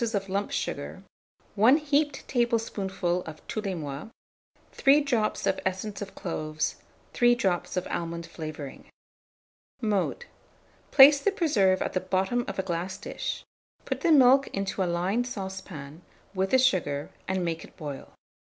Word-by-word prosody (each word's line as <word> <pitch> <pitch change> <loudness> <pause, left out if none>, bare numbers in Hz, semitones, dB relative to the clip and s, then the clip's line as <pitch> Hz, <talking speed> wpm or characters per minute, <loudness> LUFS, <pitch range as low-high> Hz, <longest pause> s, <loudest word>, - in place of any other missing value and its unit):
of 195 -1 -1
lump 200 +2 -1
sugar, - - -4 0.5
1 230 +8 +6
heaped 295 -1 0
tablespoonful 205 -7 0
of 160 -1 -10
tous 215 - -3
les 195 -3 -2
mois, 145 +2 -6 0.6
3 280 +1 +5
drops 240 -7 0
of - - +1
essence 190 +2 -3
of 200 -1 -7
cloves, 155 -3 -3 0.4
3 240 0 +4
drops 185 -5 -1
of 180 - 0
almond 170 0 -4
flavouring. 155 -4 -8 0.9
Mode. 215 - -1 0.6
Place 285 +1 +9
the - - +3
preserve 210 - +2
at - - -4
the 185 - +1
bottom 190 +6 0
of - - -5
a 190 - 0
glass 180 +1 -3
dish; - - -5 0.4
put - - -3
the 340 - +3
milk 270 -1 +6
into 195 0 -3
a 180 - +1
lined 195 +8 0
saucepan, 190 - -7 0.3
with 190 0 0
the 260 - +5
sugar, 180 - +1 0.2
and 190 -1 -1
make 165 -1 -3
it - - -16
boil. 145 -3 -7
190 Hz, 150 wpm, -27 LUFS, 175-240 Hz, 0.9 s, Place